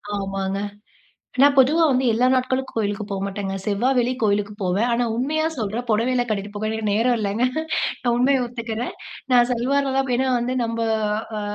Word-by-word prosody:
ஆமாங்க. 195 0 -3 0.8
நான் 280 +1 +6
பொதுவா 280 +5 +5
வந்து 260 0 +2
எல்லா 240 +3 +2
நாட்களுக்கும் 260 0 -1
கோயிலுக்கு 205 -1 -1
போமாட்டேங்க. 195 0 -3
செவ்வா, 210 +4 0
வெள்ளி 245 +1 +2
கோயிலுக்கு 205 -1 +1
போவேன். 190 +5 +1
ஆனா, 240 +1 +1
உண்மையா 305 +6 0
சொல்றேன், 225 +2 -3
பொடவையெல்லாம் 245 +3 +1
கட்டிட்டு 205 -1 -2
போக 215 +1 -2
எனக்கு 220 0 -3
நேரம் 235 +3 +2
இல்லங்க. 210 +3 0 0.6
நான் 240 -2 +1
உண்மயை 260 +2 +3
ஒத்துக்கிறேன். 235 -1 -5 0.4
நான் 240 -1 +5
சல்வார்ல 270 +3 +1
தான் 270 0 +1
ப் - - 0
ஏன்னா 260 +1 +1
வந்து 245 +2 -2
நம்ப 230 0 -3 0.6
அ - - -3
235 Hz, 165 wpm, -22 LUFS, 205-255 Hz, 0.8 s, நான்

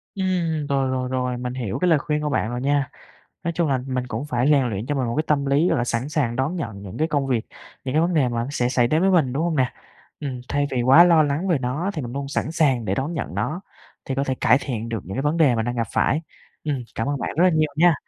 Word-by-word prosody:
Ừm, 175 -6 -1
rồi, 135 -2 0
rồi, 130 -1 -1
rồi. 125 -1 -1
Mình 125 0 -4
hiểu 120 -7 -3
cái 180 - +1
lời 160 - +5
khuyên 150 +1 -2
của 150 - 0
bạn 125 -4 0
rồi 120 0 -3
nha. 140 0 +1 0.5
Nói 170 - 0
chung 170 -1 0
là 135 -2 +2
mình 130 -1 -2
cũng 125 +2 -4
phải 125 0 +1
rèn 140 -4 +4
luyện 105 0 -4
cho 145 - -1
mình 130 -3 0
một 115 - -2
cái 155 - +2
tâm 140 -2 +1
lý, 145 +5 +3
gọi 165 - +2
là, 120 - +1
sẵn 120 +2 -2
sàng 140 -6 -1
đón 135 +8 -1
nhận 110 - -5
những 95 -2 -8
cái 160 +1 +1
công 145 -3 0
việc, 125 -4 0 0.4
những 130 0 -3
cái 155 - +4
vấn 175 +1 +1
đề 140 -6 +3
mà 120 0 -2
sẽ 125 -4 0
xảy 125 -1 +2
đến 155 +5 +2
với 195 - +4
mình, 160 -9 +3
đúng 140 +4 -1
hông 170 -2 0
nè? 130 -3 +1 0.5
Ừm, 130 -4 -4
thay 145 0 +1
vì 125 -2 0
quá 135 +8 +8
lo 170 -3 +5
lắng 150 +6 -1
về 170 -5 +3
nó 135 +9 -2
thì 155 - -3
mình 120 -1 -6
luôn 140 +1 -4
sẵn 150 +2 -2
sàng 140 -8 +2
để 95 -2 0
đón 135 +9 -2
nhận 155 - -4
nó, 160 +4 -2 0.4
thì 135 - -3
có 135 +1 0
thể 130 - -1
cải 125 - +5
thiện 115 -5 -4
được 115 -1 -2
những 95 - -7
cái 135 - -1
vấn 150 +3 +1
đề 150 -7 +4
mình 110 - 0
đang 120 +1 -3
gặp 115 -1 0
phải. 150 - +2 0.4
Ừm, 145 -4 -1
cảm 115 - -2
ơn 145 -1 -1
bạn - - -3
rất 170 - +4
là 185 - +6
nhiều 155 -2 +1
nha. 170 +1 +5
140 Hz, 295 wpm, -23 LUFS, 125-155 Hz, 0.5 s, quá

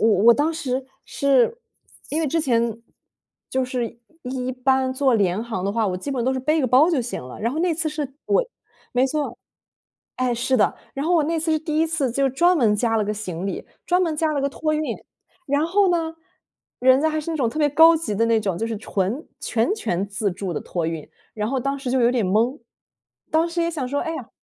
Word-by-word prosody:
我 225 - +4 0.2
我 235 0 +8
当 300 +3 +1
时 265 -5 -2 0.2
是 280 - +2 0.5
因 310 +3 -1
为 315 - +1
之 330 +4 +1
前 235 -4 0 0.7
就 260 0 +1
是 245 -2 -4 0.2
一 255 0 -3
般 260 +1 +1
坐 265 -2 +2
廉 200 0 +1
航 220 -6 -4
的 200 - 0
话， 225 0 0
我 185 - -1
基 280 +10 -5
本 250 -4 -1
都 260 - +2
是 260 - -2
背 305 +4 +1
个 260 - +1
包 270 +8 +5
就 280 -7 +1
行 240 - -5
了， 125 0 -9
然 230 +3 -1
后 305 - -3
那 345 0 +1
次 325 0 -1
是 300 -3 -4
我 - - +2 0.5
没 250 +2 +3
错。 300 +2 -2 0.8
哎， 255 -1 0
是 255 +3 +1
的， 210 - +2 0.2
然 280 +3 -2
后 355 - +3
我 325 - +4
那 330 +2 0
次 320 0 0
是 310 - +2
第 310 -1 -2
一 325 - +3
次 310 -6 -1
就 275 +3 +1
专 345 +7 +3
门 220 -6 +3
加 225 0 +1
了 215 - +1
个 210 - -2
行 190 -3 -5
李， - - -4 0.2
专 360 +1 +3
门 325 -3 -1
加 310 0 +1
了 285 - 0
个 280 - +1
托 310 +2 -1
运， 305 - 0 0.6
然 285 +2 +1
后 390 +3 +3
呢， 325 -1 -1 0.6
人 260 +1 +5
家 315 - +2
还 310 0 -1
是 320 - -5
那 325 - -2
种 255 -6 +1
特 270 - -8
别 295 -1 +4
高 325 +3 +7
级 310 -10 -3
的 230 +2 +2
那 225 -1 +3
种， 195 -4 -2
就 225 - -1
是 225 -1 -3
纯 205 - -2 0.2
全 235 - 0
权 195 - -2
自 200 +1 -1
助 190 0 -4
的 - - -3
托 170 -3 -3
运， 165 -2 -5 0.3
然 210 0 -2
后 265 -1 -1
当 275 +2 -2
时 270 -2 -5
就 260 - +2
有 240 0 +4
点 235 -6 +1
懵。 230 +8 +1 0.7
当 320 +2 +2
时 340 0 -1
也 335 - 0
想 290 -6 -3
说， 285 +2 -1
哎 325 -2 -3
呀。 255 -7 -7
265 Hz, 260 characters per minute, -23 LUFS, 230-310 Hz, 0.8 s, 我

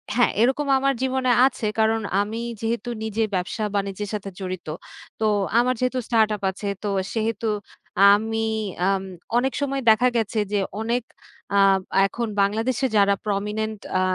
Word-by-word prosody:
হ্যাঁ, 245 - +4
এরকম 270 +4 +2
আমার 275 0 +2
জীবনে 260 -1 +1 0.2
আছে। 230 -4 -3
কারণ 220 0 +2 0.2
আমি 220 +3 -3 0.2
যেহেতু 230 +1 -2
নিজের 220 0 -1
ব্যবসা 185 +4 -2
বাণিজ্যের 200 0 -2
সাথে 200 -1 -4
জড়িত। 185 -3 -5 0.5
তো 215 - +3 0.3
আমার 250 +1 +2
যেহেতু 255 0 0
স্টার্টআপ 220 -3 +2
আছে 200 +2 -7 0.2
তো 205 - -1 0.2
সেহেতু 225 0 -1 0.7
আমি 225 +1 -1 0.4
আম 195 -1 +1 0.3
অনেক 265 +2 +1
সময় 275 -1 -1
দেখা 245 +4 +4
গেছে 220 0 -1
যে 205 - +2 0.2
অনেক 235 +1 -1 0.5
আ - - +6 0.5
এখন 235 +3 -3
বাংলাদেশে 225 +6 +1
যারা 200 0 +4
prominent 210 +1 -2 0.2
আ - - +2
220 Hz, 145 wpm, -23 LUFS, 205-245 Hz, 0.7 s, আ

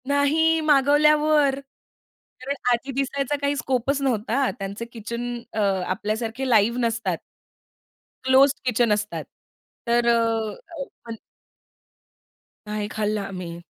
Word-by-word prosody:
नाही 305 +3 +3
मागवल्यावर, 295 0 +4 0.8
कारण 275 +2 -3 0.2
आधी 245 +3 0
दिसायचा 275 +1 -1
काही 285 0 +1
स्कोप 260 0 0
नव्हता. 255 +1 +1
त्यांचे 200 +4 -5
किचन 235 +1 -5 0.2
अ, 220 - -1 0.3
आपल्यासारखे 225 +6 -2
लाईव्ह 230 +1 +3
नसतात. 230 -1 -1 1.1
क्लोज्ड 270 +3 +5
किचन 240 -2 +2
असतात. 210 0 -3 0.6
तर 235 0 +2
अ, 225 -2 +2 0.3
आपण 235 -4 -9 1.5
नाही 210 0 -3
खाल्लं 210 -1 -1
आम्ही. 180 -3 -6
240 Hz, 100 wpm, -24 LUFS, 220-275 Hz, 1.5 s, क्लोज्ड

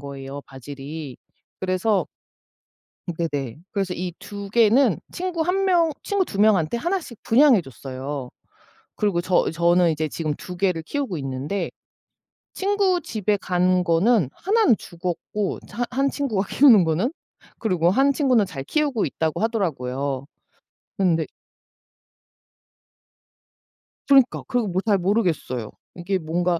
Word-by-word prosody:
거예요 140 0 -7
바질이. 140 +1 -8 0.4
그래서 190 +3 +1 1.1
네네. 145 -7 -3
그래서 195 -3 -1
이 180 -1 -4
2 200 -1 -8
개는 230 - +4
친구 355 -2 -2
1 370 +4 +1
명 340 -4 +3
친구 400 -2 0
2 200 - -6
명한테 205 -3 +3
1 365 +9 0
씩 240 -9 -12
분양해 250 -4 +5
줬어요. 135 0 -6 0.7
그리고 200 -5 +1
저 180 0 +2
저는 170 +1 +3
이제 155 0 -1
지금 155 0 -3
2 180 +4 -9
개를 180 -3 0
키우고 265 - -3
있는데 135 +8 -3 0.8
친구 390 -2 +1
집에 210 - -1
간 180 -1 +1
거는 175 - +3
1 435 +4 +2
는 235 - +5
죽었고 180 +4 -4
이제 - - -15
한 245 +1 -1
한 275 +3 +1
친구가 225 -10 -1
키우는 240 -9 +6
거는. 165 - 0 0.5
그리고 180 -6 +2
1 270 +8 +3
친구는 255 -7 +3
'잘 155 -7 -6
키우고 290 - 0
있다.'고 160 +2 -2
하더라고요. 140 - -2 0.7
근데 170 -5 +2 2.8
그러니까 270 -3 +4
그거 245 -4 0
뭐 185 0 -1
잘 205 -3 +3
모르겠어요. 175 - -1 0.2
이게 180 +2 -1
뭔가 170 +1 0
185 Hz, 250 characters per minute, -23 LUFS, 160-240 Hz, 2.8 s, 키우는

